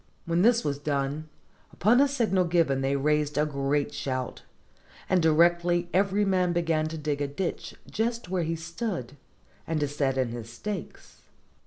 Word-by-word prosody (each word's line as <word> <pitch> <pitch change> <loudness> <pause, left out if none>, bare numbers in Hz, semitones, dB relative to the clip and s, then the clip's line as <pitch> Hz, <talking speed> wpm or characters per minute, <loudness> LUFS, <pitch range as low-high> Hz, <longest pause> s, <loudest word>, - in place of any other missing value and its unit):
When 170 +1 +1
this 235 +3 +4
was 140 -1 -2
done, 145 +1 -2 0.4
upon 235 +7 +4
a 285 - +5
signal 225 -9 +1
given 165 -6 +2
they 135 +1 +1
raised 150 +1 +1
a 150 - +3
great 140 0 -1
shout, 130 -2 -3 0.7
and 185 -1 +3
directly 175 +2 +3
every 200 +2 +2
man 185 -2 +2
began 165 -2 +1
to 160 +1 -5
dig 145 -1 -2
a 145 - 0
ditch 165 +6 -4
just 230 0 -2
where 185 0 -1
he 165 0 -1
stood, 170 - -5 0.5
and 160 -1 0
to 145 - +1
set 140 -2 -1
in 130 -2 +1
his 115 -1 -7
stakes. 195 - -7
160 Hz, 165 wpm, -27 LUFS, 145-185 Hz, 0.7 s, a